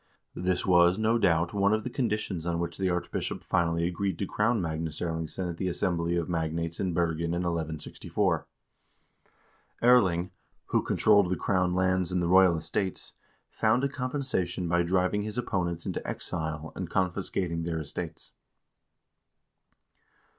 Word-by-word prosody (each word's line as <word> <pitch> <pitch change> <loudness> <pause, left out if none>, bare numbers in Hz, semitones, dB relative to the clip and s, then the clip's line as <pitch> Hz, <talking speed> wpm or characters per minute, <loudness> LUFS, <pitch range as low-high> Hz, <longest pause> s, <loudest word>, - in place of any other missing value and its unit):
This 90 0 -1
was, 90 0 +5
no 110 +2 +2
doubt, 85 -3 +2
one 100 0 +3
of 110 - -3
the - - -3
con 125 -1 0
ditions 95 -5 -2
on 85 - 0
which 85 +2 -3
the 95 -1 +1
archbishop 90 0 -3
finally 85 0 +1
agreed 95 0 -2
to 100 - -2
crown 115 +4 +1
Magnus 80 -2 -3
Erlingsson 80 +2 -3
at 85 -1 -5
the 95 - -2
assembly 85 -1 0
of 85 -2 -1
magnates 85 -1 -2
in 95 -2 0
Bergen 85 0 0
in 90 - -1
1164. 80 -3 -1 1.4
Erling, 95 -8 +4 0.4
who - - +2
controlled 100 -4 +4
the 95 - +1
crown 90 -2 +1
lands 95 -1 +1
and 90 - +1
the 85 - 0
royal 90 -1 +6
estates, 95 +4 -3 0.4
found 115 +4 +2
a 140 - +2
com 130 -2 -3
pensation 95 -11 -1
by 85 +1 +2
driving 95 +3 +1
his 105 +2 -4
opponents 85 -7 -2
into - - -3
exile 80 -1 -4
and 90 -3 -4
confiscating 90 -2 -1
their 85 0 -2
estates. 80 +2 -6
90 Hz, 155 wpm, -28 LUFS, 85-95 Hz, 1.4 s, royal